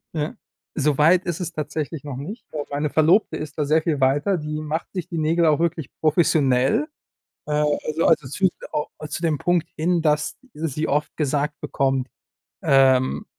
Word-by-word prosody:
Ja. 155 +9 -2 0.4
So 145 -1 +2
weit 170 +5 +4
ist 175 0 -3
es 175 - -3
tatsächlich 155 0 -4
noch 140 - -5
nicht. 160 - -7
Aber 150 -1 -2
meine 145 +1 -1
Verlobte 160 +3 +3
ist 150 0 -7
da 150 - 0
sehr 155 +2 +3
viel 155 -3 -1
weiter. 145 +8 +2
Die 150 0 -4
macht 155 +2 -3
sich 180 -4 -4
die 170 - -4
Nägel 165 +2 +2
auch 155 0 +3
wirklich 165 -4 -1
professionell. 150 - +2 0.6
Äh, 150 - -5 0.3
also 155 +2 0
also, 150 -4 +3
zu 190 +8 +2 0.3
au 150 - -1 0.2
zu 150 - -5
dem 160 -4 +1
Punkt 175 +1 +1
hin, 170 +2 +1
dass 150 -1 +1 0.2
sie 155 0 -3
oft 150 +1 -1
gesagt 150 0 -1
bekommt 135 -3 0 0.5
ähm, 130 -1 +3
155 Hz, 175 wpm, -23 LUFS, 145-165 Hz, 0.6 s, weit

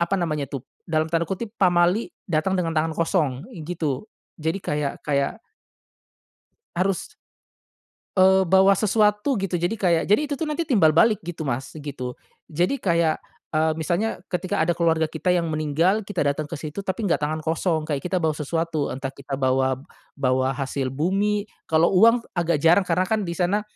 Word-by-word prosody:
apa 170 +3 +1
namanya 150 -4 -1
tuh 135 - -5 0.2
dalam 160 -2 0
tanda 165 +1 +1
kutip 205 +4 -5
pamali 180 +3 +2 0.2
datang 175 +4 +1
dengan 165 -2 -2
tangan 160 +1 +1
kosong 165 -5 +1 0.3
gitu, 155 -3 -3 0.3
jadi 160 +3 -2
kayak 150 -3 -2
kayak 140 +8 0 1.4
Harus. 185 +1 0 1.1
Eee, 190 0 +5
bawa 190 +1 +6
sesuatu 210 +4 +2
gitu, 190 -3 -1
jadi 175 +6 0
kayak 170 -5 +2
jadi 210 +8 +5
itu - - -1
tuh 320 - -1
nanti 330 +3 -1
timbal 200 - +4
balik 215 +4 +5
gitu 170 -2 -5
Mas, 130 +1 -2
gitu, 135 -4 -6 0.3
jadi 175 - 0
kayak, 170 -3 +2 0.4
eee, 155 0 +2
misalnya 175 +7 -1
ketika 180 0 -1
ada 175 - +2
keluarga 165 -2 +2
kita 160 +3 -2
yang 175 -1 +1
meninggal 155 +7 +1
kita 185 -7 -1
datang 145 +1 0
kesitu 155 +5 -6
tapi 190 +4 -2
nggak 170 - +2
tangan 155 +1 -1
kosong, 160 0 0
kayak 145 -3 -1
kita 180 +1 -1
bawa 160 -1 +1
sesuatu, 160 0 -1
entah 135 0 -4
kita 140 0 -9
bawa 130 -1 +1 0.4
bawa 130 -1 +1
hasil 135 -1 -2
bumi, 200 +7 0 0.2
kalau 160 +3 +4
uang 230 +5 +5
agak 170 -2 +2
jarang 175 +4 +5
karena 180 +2 +2
kan 220 0 0
di 170 - -2
sana 190 +4 +1
170 Hz, 165 wpm, -24 LUFS, 150-190 Hz, 1.4 s, bawa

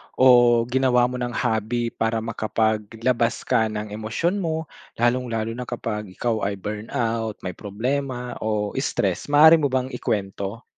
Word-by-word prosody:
o 120 -2 +6
ginawa 130 -1 +3
mo 125 +1 -1
ng 120 -1 -3
hobby 115 0 -1
para 115 0 -1
makapaglabas 115 +1 -1
ka 110 - +2
ng 105 -1 -5
emosyon 110 - -1
mo 160 -3 -3 0.2
lalong-lalo 120 -2 0
na 125 +2 -6
kapag 105 -3 -4
ikaw 115 -4 -1
ay 100 - -2
burnout, 110 +2 -3
may 90 - -3
problema 125 +6 -3
o 105 -1 -1
stressed? 100 -8 -1
Maaari 155 +3 +7
mo 145 - +2
bang 130 -1 -1
ikwento? 100 +1 -3
115 Hz, 140 wpm, -23 LUFS, 110-125 Hz, 0.2 s, Maaari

